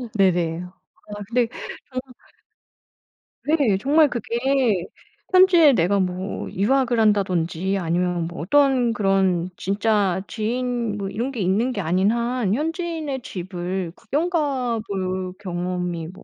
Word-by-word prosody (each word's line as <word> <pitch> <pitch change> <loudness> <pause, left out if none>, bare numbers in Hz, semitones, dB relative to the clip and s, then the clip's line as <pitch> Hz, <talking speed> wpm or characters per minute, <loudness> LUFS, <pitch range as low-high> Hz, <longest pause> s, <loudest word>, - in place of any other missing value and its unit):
네네. 175 -3 +2 0.5
아 205 - -7
근데 240 -1 +2 0.4
저는 255 0 -6 1.3
네. 285 -10 +2
정말 290 +6 +4
그게 235 0 -3 1.0
현지에 350 -6 +7
내가 195 +1 +2
뭐 185 +1 -3
유학을 245 +4 +1
한다든지 190 -3 +1
아니면 175 0 0
뭐 175 - -9
어떤 260 - +3
그런 190 -4 +1
진짜 200 -2 +1
지인 235 -1 -2
뭐 195 -1 -3
이런 240 +7 -3
게 225 - -3
있는 215 +8 +1
게 200 - -2
아닌 185 +4 +2
한 235 -3 0
현지인의 320 -2 -2
집을 180 -2 -4
구경 315 +6 -1
가 265 -8 0
볼 185 -1 -3
경험이 180 -3 -3
뭐 185 - -12
205 Hz, 225 characters per minute, -23 LUFS, 185-255 Hz, 1.3 s, 현지에